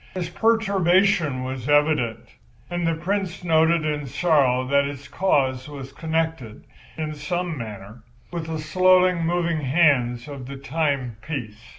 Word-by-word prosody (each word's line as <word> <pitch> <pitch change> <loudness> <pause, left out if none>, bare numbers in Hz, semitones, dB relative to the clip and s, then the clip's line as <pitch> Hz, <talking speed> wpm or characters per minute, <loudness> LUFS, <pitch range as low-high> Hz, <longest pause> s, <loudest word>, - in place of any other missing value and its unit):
His 175 -2 -3
perturbation 190 - +2
was 130 0 -5
evident, 145 -6 +2 0.5
and 175 -1 -1
the 165 - +1
Prince 185 +2 -3
noted, 160 -1 +3
in 150 -2 -2
sorrow, 130 -4 +2
that 140 +1 +2
its 140 -1 -8
cause 135 -8 0
was 135 -2 -8
connected, 160 -7 -3 0.3
in 155 -1 -3
some 170 +3 -3
manner, 110 -2 -8 0.3
with 170 -2 -4
the 160 -1 -3
slowly 185 +3 +4
moving 170 -1 -1
hands 130 -4 +2
of 140 -3 -8
the 140 0 -7
timepiece. 130 -5 -3
155 Hz, 130 wpm, -23 LUFS, 130-170 Hz, 0.5 s, slowly